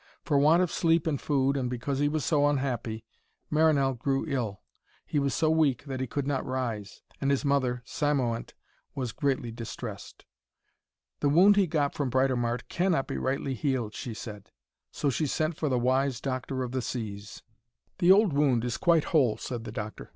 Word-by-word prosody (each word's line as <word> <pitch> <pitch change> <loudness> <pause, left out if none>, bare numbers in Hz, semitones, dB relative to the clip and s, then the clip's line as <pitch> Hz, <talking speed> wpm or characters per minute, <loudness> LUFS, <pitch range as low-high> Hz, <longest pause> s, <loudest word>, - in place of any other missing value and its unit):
For 145 -4 +3
want 160 +5 +5
of 180 - -2
sleep 165 -1 +2
and 150 -4 -1
food, 140 -1 +1
and 130 -3 -1
because 125 +3 -3
he 145 0 +2
was 155 -2 -2
so 145 -2 +3
unhappy, 125 -6 -2 0.5
Marinell 150 -4 +3
grew 135 +2 -1
ill. 120 -9 -2 0.4
He 150 - 0
was 140 -1 0
so 155 -1 +2
weak 155 -6 +2
that 135 -2 -4
he 130 - -2
could 140 +3 -3
not 140 -2 -1
rise, 120 -6 -4 0.2
and 135 - +1
his 140 +1 +1
mother, 130 -3 +1
Cymoënt, 130 -6 -1 0.4
was 125 -4 -3
greatly 135 -4 -1
distressed. 115 -1 -8 0.9
'The 145 - +2
wound 185 +7 +6
he 200 -2 +3
got 150 -3 0
from 140 -3 -2
Britomart 125 -2 0
cannot 175 -6 +1
be - - -4
rightly 135 +1 -1
healed,' 130 -5 -1
she 115 0 -6
said. 105 -3 -9 0.4
So 140 - 0
she 150 +4 -1
sent 155 +3 -1
for 155 -1 -1
the 130 - +1
wise 130 +1 +1
doctor 130 0 -3
of 125 - -5
the 130 0 -1
seas. 100 -4 -6 0.6
'The 180 0 +6
old 200 -3 +5
wound 135 -5 +2
is 120 - -2
quite 170 -3 +3
whole,' 130 -9 +2
said 120 -3 -5
the - - -6
doctor. 110 -1 -6
135 Hz, 185 wpm, -28 LUFS, 120-150 Hz, 0.9 s, wound